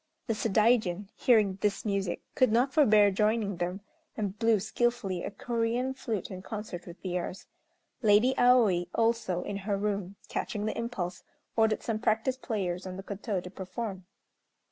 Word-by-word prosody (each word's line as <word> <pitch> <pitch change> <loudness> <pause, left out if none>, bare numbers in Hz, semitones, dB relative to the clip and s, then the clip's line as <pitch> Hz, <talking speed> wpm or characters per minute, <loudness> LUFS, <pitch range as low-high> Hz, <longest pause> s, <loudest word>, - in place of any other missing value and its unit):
The 225 - 0
Sadaijin, 210 -3 +2
hearing 210 -6 +3
this 205 0 0
music, 200 -3 -1
could 255 -3 +3
not 250 +4 +2
forbear 215 -9 +6
joining 210 -1 +1
them, 180 +3 -3 0.4
and 205 -3 -2
blew 225 -2 +4
skilfully 215 -3 -1
a - - -3
Corean 235 +4 -1
flute 225 -8 -4
in 185 -1 -6
concert 205 -4 -6
with 175 +1 -10
theirs. 180 0 -3 0.6
Lady 220 +4 +5
Aoi, 225 -8 +4
also, 225 -6 +1
in 200 - -4
her 200 0 -2
room, 200 -2 -2
catching 210 0 -3
the 215 - -2
impulse, 190 -7 -3 0.3
ordered 220 -1 +2
some 220 -2 -1
practised 235 +3 0
players 190 -5 -2
on 185 0 -6
the 195 - -7
koto 200 -1 -3
to 180 - -9
perform. 190 -1 -6
210 Hz, 155 wpm, -29 LUFS, 190-230 Hz, 0.6 s, forbear